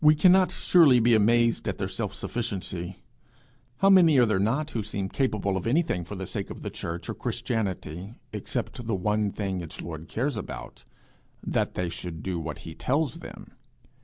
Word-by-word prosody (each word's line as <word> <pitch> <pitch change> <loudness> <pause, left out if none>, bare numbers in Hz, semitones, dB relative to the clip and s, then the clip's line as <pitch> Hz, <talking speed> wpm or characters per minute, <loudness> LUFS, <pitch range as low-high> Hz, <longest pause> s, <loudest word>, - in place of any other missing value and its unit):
We 150 0 +7
cannot 185 +3 +5
surely 155 -9 +5
be 120 +1 +4
amazed 115 +2 +3
at - - -2
their - - -2
self - - -4
sufficiency. 95 -5 -4 0.8
How 195 0 +6
many 170 -6 +7
are 125 - +6
there 110 -4 +1
not 135 +10 0
who 115 - -1
seem 100 -2 -3
capable 105 -7 0
of 95 - -3
anything 130 - +1
for 105 - -7
the 95 0 -5
sake - - -4
of - - -8
the - - -4
church 85 +1 -5
or - - -2
Christianity, 100 -3 -3 0.2
except 120 - -4
the 110 - +1
one 105 +2 0
thing 95 -3 -3
its 85 - -8
Lord 80 -1 -7
cares 135 +6 -1
about - - -7 0.6
that - - 0
they 90 - -1
should 85 -1 -6
do 90 -3 -2
what 80 - -5
he 80 - -7
tells 140 - 0
them! - - -10
110 Hz, 185 wpm, -27 LUFS, 95-130 Hz, 0.8 s, We